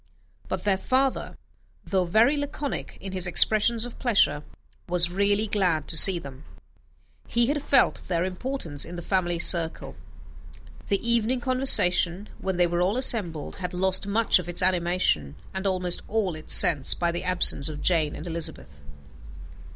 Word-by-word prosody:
But - - -5
their 195 -2 -1
father, 265 +3 -2 0.5
though 190 -2 -1
very 225 - +2
laconic 285 0 -6
in 195 - -9
his 185 -1 +1
expressions 220 +5 +3
of 245 - -11
pleasure, 200 - +1 0.5
was 175 -1 +1
really 200 +3 0
glad 180 -8 -2
to - - +1
see 180 +3 +7
them; 140 -3 -11 0.8
he 235 0 0
had 290 +3 -2
felt 280 - 0
their 175 -1 -2
importance 185 - -5
in 175 - -9
the 175 - -8
family 175 -2 -2
circle. 170 -1 +4 0.9
The 200 +2 -2
evening 235 +2 0
conversation, 210 -7 +2
when 190 -2 -4
they 175 - +2
were 175 0 -2
all 195 +6 -1
assembled, 190 - +1
had 180 -1 -6
lost 190 +2 +3
much 215 0 +2
of 175 - -8
its 175 +2 -4
animation, 175 - -1 0.2
and 190 +1 -4
almost 180 -2 -2
all 210 -4 -2
its 155 0 0
sense, 140 -5 +2
by 170 -1 -2
the 175 - -6
absence 180 -5 +3
of 150 -1 -8
Jane 160 -4 0
and 155 - -10
Elizabeth. 160 - -4
185 Hz, 160 wpm, -24 LUFS, 170-220 Hz, 0.9 s, see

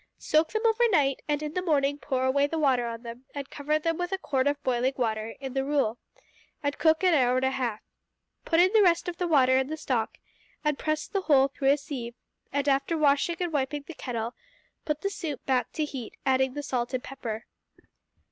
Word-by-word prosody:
Soak 310 +1 +2
them 435 +1 -1
overnight, 440 - +3
and 295 0 0
in 300 0 -4
the 365 - -1
morning 285 -4 +1
pour 260 -2 -1
away 280 +2 +3
the 325 - -3
water 260 -6 +2
on 230 0 -6
them 235 +2 -9
and 280 -1 -6
cover 300 +1 0
them 330 +2 -1
with 355 +1 -2
a 385 - 0
quart 285 -6 0
of 285 - +2
the 285 - -42
boiling 255 +1 +1
water 220 -2 -2
in 265 -2 -6
the 270 0 0
rule, 270 -5 0 0.6
and 285 0 0
cook 320 +2 +3
an 365 -2 +5
hour 250 -4 +3
and 255 +1 +1
a 265 - +2
half. 240 -5 -2 0.6
Put 330 - +2
in 370 +3 +5
the 440 - +6
rest 345 -3 +3
of 350 -1 -4
the 355 - -1
water 260 -5 +5
and 265 +1 0
the 315 - -3
stock, 250 -7 -2 0.5
and 300 -2 0
press 310 -1 -1
the 395 - -1
whole 275 -6 +4
through 270 0 0
a 280 - +5
sieve, 255 -5 -6 0.4
and, 285 0 -1
after 275 +4 +2
washing 295 +3 +3
and 350 -3 -2
wiping 285 0 -1
the 335 - -9
kettle, 235 -4 -4 0.5
put 300 0 -2
the 395 - -1
soup 295 -9 -5
back 255 -2 +1
to 310 - 0
heat, 265 -6 -7
adding 265 0 +2
the 290 - -4
salt 250 -2 -2
and 250 - -3
pepper. 235 -4 -6
280 Hz, 225 wpm, -27 LUFS, 260-310 Hz, 0.6 s, the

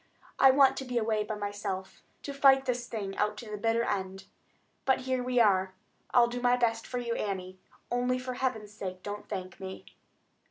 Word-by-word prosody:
I 270 - +8
want 270 0 +5
to - - -3
be 250 -1 -2
away 220 -2 +1
by 210 +1 -4
myself, 205 -2 -5 0.2
to 280 - -5
fight 270 -1 +5
this 245 -1 -1
thing 200 -4 -4
out 210 0 0
to 220 -2 -8
the - - -2
bitter 225 +3 +1
end. 190 -2 -3 0.6
But 265 -1 +2
here 260 -1 -1
we 250 0 +1
are. 190 -4 +3 0.4
I'll 245 -1 +6
do 245 +1 -4
my 245 0 +4
best 230 -2 0
for 250 - -4
you, 235 -1 -2
Annie, 185 -3 -4 0.3
only 250 +1 +1
for 255 0 -4
Heaven's 235 -5 -2
sake 185 -3 -6
don't 205 0 -6
thank 185 -1 -5
me." 190 0 -7
225 Hz, 195 wpm, -30 LUFS, 200-250 Hz, 0.6 s, I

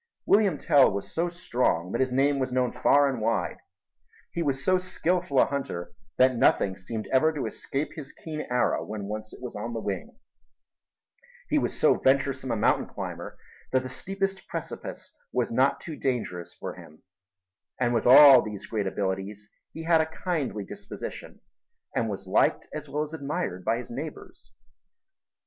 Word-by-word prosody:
William 200 -6 +4
Tell 140 -2 +5
was 100 0 -5
so 170 +2 0
strong 125 - 0
that - - 0
his 130 -1 +1
name 140 +2 +2
was 130 -1 -1
known 125 -1 +1
far 145 0 +4
and 130 -5 -2
wide; 115 +1 0 0.7
he 170 - -2
was 135 -4 -1
so 185 0 +4
skilful 180 -4 0
a - - +7
hunter 90 -11 -4 0.2
that 130 0 +5
nothing 100 -4 +3
seemed 110 +3 -5
ever 155 +5 +5
to 150 -3 -3
escape 140 +3 -3
his 145 -4 -8
keen 155 -2 -6
arrow 125 0 +1
when 105 -1 -6
once 110 +1 -5
it - - -13
was 120 -3 -6
on 115 +3 -4
the 115 - -2
wing; 110 - -5 1.3
he 300 - +3
was - - -3
so 155 - +4
venturesome 135 0 +1
a - - +1
mountain 105 - +2
climber - - -7 0.3
that 130 0 +2
the 130 - -5
steepest 195 +6 -3
precipice - - -6 0.2
was - - 0
not - - +3
too 160 - -7
dangerous 115 -11 -3
for - - -6
him; 80 - -15 0.8
and 120 -1 +2
with 115 - +1
all 135 0 +10
these 105 -2 -7
great 105 -3 -2
abilities 100 +2 -3 0.2
he 160 - -7
had 165 -1 +4
a 160 - -1 0.2
kindly 145 - -1
disposition - - -8 0.5
and 115 - +1
was 100 -1 -5
liked 95 - +2
as 150 -1 -6
well 150 +2 -1
as 155 +1 -8
admired 140 - -3
by 115 - +1
his 120 0 -8
neighbors. 350 - -8
130 Hz, 170 wpm, -27 LUFS, 110-155 Hz, 1.3 s, all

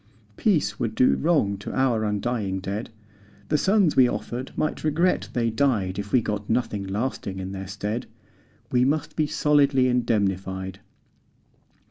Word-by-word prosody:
Peace 145 - +1
would 110 -2 -2
do 125 - +4
wrong 140 - +1
to - - -6
our 125 -4 +1
undying 105 -2 -1
dead, 100 +4 -4 0.6
The 150 - +3
sons 195 -3 +3
we 130 -2 +6
offered 125 +2 -4
might 155 - -1
regret 160 +4 +1
they 115 -2 +1
died 110 -7 +1
If 100 0 -5
we 125 - +3
got 105 -1 -3
nothing 110 -4 0
lasting 100 -1 -3
in 95 0 -5
their 95 0 -6
stead. 105 +4 -4 0.6
We 125 0 +3
must 145 +4 0
be 155 -1 +1
solidly 140 -3 +3
indemnified. 95 -6 -1
115 Hz, 145 wpm, -25 LUFS, 100-135 Hz, 0.6 s, we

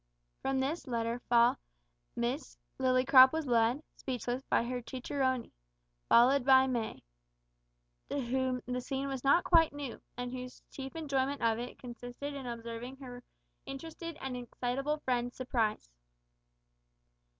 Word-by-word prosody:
From 270 0 0
this 290 +5 -2
letter 230 -1 -1
fall 235 0 +5 0.6
Miss 245 +5 -2 0.2
Lillycrop 255 0 +7
was 320 -1 -2
led, 240 +3 +2
speechless, 250 -1 -3
by - - +3
her 245 +1 -3
cicerone, 260 0 -2 0.6
followed 255 +3 +6
by 265 0 +7
May, 240 -4 -3 1.1
to 285 - -1
whom 255 0 -1
the 250 0 -2
scene 270 +2 -3
was 270 -2 -4
not 280 +6 +5
quite 330 -3 +5
new, 285 -4 -6 0.2
and 245 0 -4
whose 255 0 -8
chief 270 +1 -7
enjoyment 280 -4 -1
of 225 0 +2
it 245 +1 -6
consisted 245 +3 -7
in 270 -3 -6
observing 235 +2 -6
her 250 -2 -9 0.5
interested 325 +3 -7
and 265 -1 -4
excitable 250 +4 -2
friend's 245 -1 0
surprise. 225 - -1
255 Hz, 130 wpm, -32 LUFS, 245-275 Hz, 1.1 s, Lillycrop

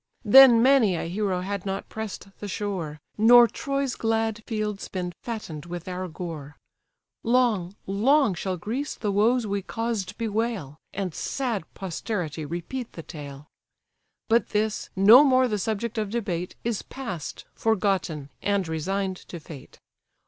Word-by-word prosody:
Then 240 +1 +9
many 255 -8 +5
a 165 - -3
hero 190 0 -1
had 200 0 -3
not 195 0 -4
press'd 220 -2 -7
the 205 - -5
shore, 185 -7 -4 0.2
Nor 240 +2 +8
Troy's 275 0 -2
glad 225 -1 -1
fields 215 -3 -3
been 180 -2 -4
fatten'd 175 -10 -6
with 175 0 -6
our 185 0 -4
gore. 155 -4 -7 0.6
Long, 225 -7 +2
long 235 +5 +3
shall 185 +1 -3
Greece 235 - -3
the 210 - -2
woes 225 +4 +3
we 200 -1 -1
caused 220 -2 -3
bewail, 220 - -2
And 190 -3 -3
sad 235 - -3
posterity 175 -4 -4
repeat 175 - -5
the 165 - -8
tale. 145 -2 -9 0.8
But 230 +1 +3
this, 215 0 -1
no 215 +8 +9
more 260 -2 +4
the 210 -3 -1
subject 220 +2 -2
of 210 -2 -2
debate, 185 -6 -3
Is 230 -3 -1
past, 190 - -6
forgotten, 190 -9 0
and 200 -3 0
resign'd 185 +4 -2
to 175 - -7
fate. 150 -3 -12
200 Hz, 140 wpm, -26 LUFS, 180-230 Hz, 0.8 s, Then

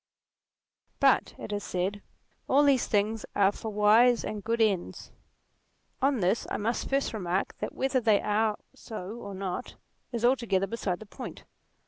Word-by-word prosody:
But, - - +3
it 210 - -6
is 205 0 -2
said, 190 +3 -2 0.5
all 285 +2 +5
these 275 -3 +3
things 215 +1 0
are 200 -1 +4
for 220 - -6
wise 220 +4 +4
and 210 -2 -5
good 230 +1 -1
ends. 195 - 0 0.9
On 270 -4 +2
this 185 +6 +1
I - - -2
must 225 +3 -2
first 275 -2 0
remark 185 -3 -2
that - - -4
whether 265 -1 +1
they 220 -3 +4
are 210 0 +1 0.2
so 205 -4 -7
or 200 -4 -7
not, 190 +5 -4 0.4
is 235 -1 -1
altogether 230 -7 +2
beside 195 -3 -3
the - - -8
point. 205 - -9
215 Hz, 155 wpm, -28 LUFS, 200-235 Hz, 0.9 s, all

